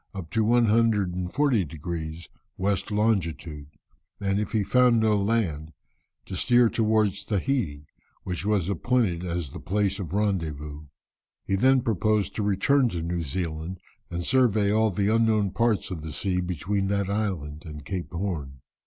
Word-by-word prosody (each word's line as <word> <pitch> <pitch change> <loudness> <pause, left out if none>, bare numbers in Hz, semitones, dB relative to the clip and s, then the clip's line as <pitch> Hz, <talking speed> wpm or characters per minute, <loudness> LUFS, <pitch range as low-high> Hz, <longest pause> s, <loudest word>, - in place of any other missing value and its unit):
up 85 -5 -7
to 110 - +2
140 110 0 +2
degrees 80 +1 -6 0.3
west 100 +1 -1
longitude, 85 -9 -1 0.5
and 100 0 0
if 105 - -3
he 110 -2 +1
found 125 +1 +4
no 110 -1 +3
land, 100 -8 -1 0.5
to - - -6
steer 120 -2 +4
towards 110 -3 +1
Tahiti, 100 - -1 0.4
which 90 -1 -4
was 100 -4 +1
appointed 100 -2 0
as 85 -5 -3
the - - -8
place 100 +1 0
of 90 -5 -5
rendezvous. 80 -7 -2 0.6
He 95 - 0
then 130 +5 +4
proposed 110 -2 +1
to - - -1
return 110 +7 +3
to 85 -5 -4
New 85 +1 -2
Zealand 85 +2 -4 0.3
and 85 0 -4
survey 110 -6 +3
all 110 +1 +3
the 100 +2 +1
unknown 110 -3 +2
parts 110 -1 0
of 85 -4 -4
the 80 0 -6
sea 90 +2 -1
between 90 +3 -1
that 100 -1 0
island 95 -8 -2
and 75 -4 -9
Cape 90 +1 -4
Horn. 80 -8 -4
100 Hz, 150 wpm, -26 LUFS, 85-110 Hz, 0.6 s, found